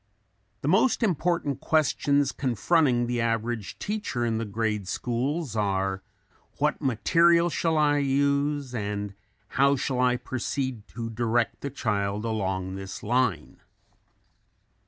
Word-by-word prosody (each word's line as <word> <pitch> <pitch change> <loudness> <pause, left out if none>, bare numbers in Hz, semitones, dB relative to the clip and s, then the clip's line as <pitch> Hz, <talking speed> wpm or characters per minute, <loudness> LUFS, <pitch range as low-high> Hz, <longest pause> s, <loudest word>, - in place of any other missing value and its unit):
The - - -3
most 220 - +3
important 170 - 0
questions 145 -2 +2
confronting 130 - +2
the 120 0 -1
average 115 -1 -2
teacher 205 - -2
in 115 -1 0
the 115 - -2
grade 105 -1 -2
schools 125 - -2
are: 95 -2 0 0.6
"What 150 +2 0
material 170 +7 +3
shall 160 -1 0
I 145 -1 +3
use 140 0 +1
and 105 -2 -3 0.4
how 140 +2 +3
shall 130 -1 -2
I 125 -1 +3
proceed 130 -2 -3
to 115 -1 -4
direct 115 +1 0
the 140 - -3
child 105 -5 -1
along 95 -4 -2
this 95 0 -7
line?" 120 -7 0
125 Hz, 120 wpm, -26 LUFS, 110-145 Hz, 0.6 s, most